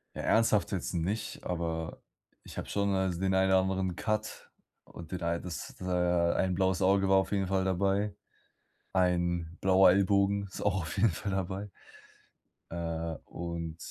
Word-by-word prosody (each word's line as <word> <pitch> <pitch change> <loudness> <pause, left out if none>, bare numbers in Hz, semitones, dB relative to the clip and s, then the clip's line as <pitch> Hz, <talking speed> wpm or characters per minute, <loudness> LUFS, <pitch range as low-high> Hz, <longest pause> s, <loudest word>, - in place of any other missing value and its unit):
Ja, - - -4
ernsthaft 110 -2 +3
jetzt 95 -1 -3
nicht, 100 +6 -3
aber 80 -2 -3 0.4
ich - - -11
habe - - -5
schon, 100 -1 0
also, 95 -2 0
den 95 0 +1
ein 95 0 +3
oder 95 - +5
anderen 95 -1 -1
Cut 110 -1 -3 0.4
und 85 -1 -11
den 90 -2 -4
ein 85 0 -1
das 85 -2 -7
äh, - - -5 0.5
ein 95 -1 +1
blaues 95 -1 +1
Auge 95 +1 +3
war 95 - +6
auf 95 +2 +1
jeden 95 -2 +1
Fall 95 0 +1
dabei, 100 +2 +1 0.8
ein 85 -2 0
blauer 95 -1 +6
Ellbogen 100 +1 +3
ist 95 - -9
auch 95 -3 +1
auf 80 - -6
jeden 115 - +4
Fall 100 +4 -4
dabei. 95 +2 -3 1.0
Äh, 85 -1 -3
und 85 -1 -5
95 Hz, 165 wpm, -30 LUFS, 85-100 Hz, 1.0 s, war